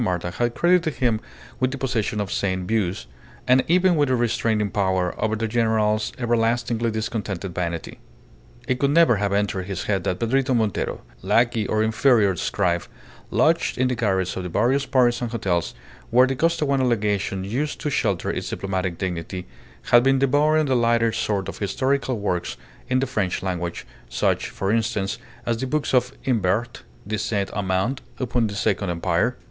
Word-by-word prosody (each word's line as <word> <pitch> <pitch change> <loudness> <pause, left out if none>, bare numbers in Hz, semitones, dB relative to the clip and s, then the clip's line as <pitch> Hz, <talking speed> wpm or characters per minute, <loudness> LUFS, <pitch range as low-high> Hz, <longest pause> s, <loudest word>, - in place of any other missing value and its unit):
Marta 90 -5 -1
had 120 +5 -1
credited 175 -3 +2
him 115 -4 +1 0.4
with 130 - +2
the 135 - -5
possession 115 -5 -1
of 100 -1 -3
sane 95 -2 -1
views, 95 - -1 0.4
and 130 +1 +5
even 180 +1 +4
with 145 -3 +2
a 130 - +3
restraining 115 -3 0
power 95 -3 0
over 110 0 +1
the 115 +1 -2
general's 110 -2 +1
everlastingly 120 -1 0
discontented 105 -4 -3
vanity. 85 -2 -4 0.7
It 125 - 0
could 140 - +2
never 155 -6 +5
have 100 0 -1
entered 100 -2 -1
his 95 -3 -4
head 95 -4 -1
that 90 - 0
Pedrito 130 +3 +1
Montero, 110 -5 -1 0.2
lackey 115 -3 +2
or 110 0 +1
inferior 110 -3 +3
scribe, 90 -2 0 0.4
lodged 165 +2 +2
in 130 0 +2
the - - 0
garrets 95 -6 0
of 95 - -3
the 90 - -5
various 130 +9 +1
Parisian 125 -2 +2
hotels 95 -7 -1 0.3
where 125 +2 +6
the 135 0 -1
Costaguana 140 -3 +1
Legation 100 -4 0
used 130 +10 -2
to 150 - -2
shelter 100 -8 0
its - - -4
diplomatic 95 -2 -3
dignity, 90 0 -4 0.5
had 120 - +8
been 135 +2 +3
devouring 150 +3 +3
the 135 -2 +1
lighter 115 -1 +3
sort 105 -3 -1
of - - -7
historical 130 +5 0
works 90 -4 -2 0.3
in 130 - +2
the 130 - +1
French 105 -9 -2
language, 90 -2 -3 0.2
such, - - 0
for 95 +1 -2
instance 110 -3 -1 0.3
as 115 -1 0
the 130 - -3
books 150 +1 -1
of 125 -1 +3
Imbert 115 -1 0 0.2
de 110 +1 -2
Saint 100 -3 -1
Amand 100 +7 -1 0.2
upon 120 -2 0
the 100 - -6
Second 100 -2 0
Empire. 85 +7 0
110 Hz, 170 wpm, -23 LUFS, 95-125 Hz, 0.7 s, had